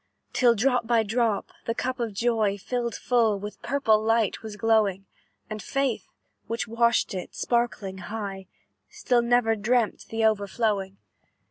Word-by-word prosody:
"Till, 240 -2 +4
drop 245 +1 +1
by 230 -1 +3
drop, 220 -1 0
the 230 - -1
cup 255 +1 -2
of 230 -2 -1
joy 220 -3 +1
Filled 235 +3 -3
full, 230 -4 +2
with 205 +1 -8
purple 225 -7 +2
light 225 -2 +1
was 220 -2 -7
glowing, 210 -3 +2 0.4
And 215 -1 -6
Faith, 270 +3 -1 0.4
which 230 +1 -3
watched 235 0 +2
it, 185 -2 -6
sparkling 230 -5 -1
high 195 -1 -6 0.4
Still 245 -1 +1
never 235 -1 +3
dreamt 230 +1 0
the 225 0 0
overflowing. 205 -2 0
225 Hz, 140 wpm, -26 LUFS, 205-240 Hz, 0.4 s, Till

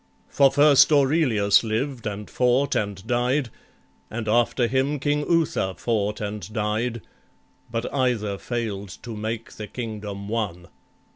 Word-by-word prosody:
For 140 -1 +5
first 145 0 +6
Aurelius 135 -9 +4
lived 115 +2 -2
and 105 0 -5
fought 125 +2 +2
and 100 -2 -2
died, 125 +2 0 0.6
And 110 0 -5
after 120 +2 +2
him 135 +4 0
King 145 +2 +1
Uther 155 - +1
fought 105 -1 -1
and 105 -1 -5
died, 110 +2 -1 0.7
But 115 +1 -3
either 115 -7 0
fail'd 110 -5 -4
to 115 -2 -6
make 110 +1 -4
the 105 - -6
kingdom 105 -4 -6
one. 105 -6 -3
115 Hz, 130 wpm, -24 LUFS, 105-130 Hz, 0.7 s, first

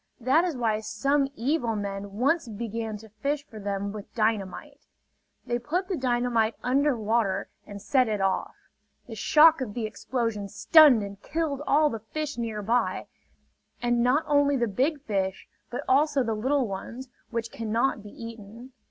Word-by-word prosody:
That 260 +7 +3
is 335 -7 -2
why 220 -3 +1
some 270 +7 0
evil 240 -2 0
men 200 -1 -5
once 270 +7 +1
began 220 0 -4
to 220 +1 -14
fish 280 +7 -3
for 220 -6 -11
them 200 0 -3
with 205 -1 -9
dynamite. 225 +6 -2 0.6
They 240 0 -1
put 355 +10 -2
the 380 - 0
dynamite 240 -4 +1
under 275 +1 +2
water 215 -3 0 0.2
and 205 -1 -8
set 255 +5 +2
it 210 -2 -1
off. 195 -1 -1 0.5
The 235 - -9
shock 310 +7 +5
of 215 -6 -4
the 235 -2 -2
explosion 220 -2 -3
stunned 265 - +6
and 200 0 -8
killed 310 -3 -2
all 300 +1 +4
the 225 - -4
fish 295 +7 -5
nearby; 225 +1 -1 0.7
and 240 0 +1
not 255 +6 +3
only 285 -1 +3
the 240 -2 +1
big 270 +8 0
fish, 190 -4 -2 0.2
but 245 - -4
also 280 0 +3
the 225 -2 -1
little 260 +4 +1
ones, 230 +6 -7 0.2
which 230 -1 -3
cannot 230 +2 -1
be 205 - -11
eaten. 230 +2 -10
235 Hz, 160 wpm, -27 LUFS, 215-275 Hz, 0.7 s, stunned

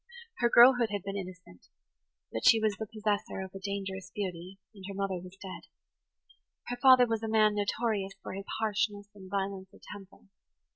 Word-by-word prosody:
Her 240 - +3
girlhood 240 -1 +7
had 205 -2 -3
been 195 0 -5
innocent; 185 - -9 0.7
but 110 - -3
she 225 - +7
was 215 -2 +1
the 220 - -4
possessor 210 -2 -2
of 190 -1 -8
a 195 - -7
dangerous 195 -1 -5
beauty, 185 -2 -5 0.2
and 195 -2 -13
her 200 - -7
mother 195 -2 -2
was 185 +1 -12
dead. 190 -2 -9 1.0
Her 245 - -3
father 255 -1 +7
was 225 -2 -2
a 225 - -3
man 215 -1 +4
notorious 205 -1 -1
for - - -6
his 195 +1 -6
harshness 205 -1 -1
and 190 -2 -13
violence 195 -1 -3
of - - -19
temper. 200 -2 -11
200 Hz, 180 wpm, -30 LUFS, 190-220 Hz, 1.0 s, girlhood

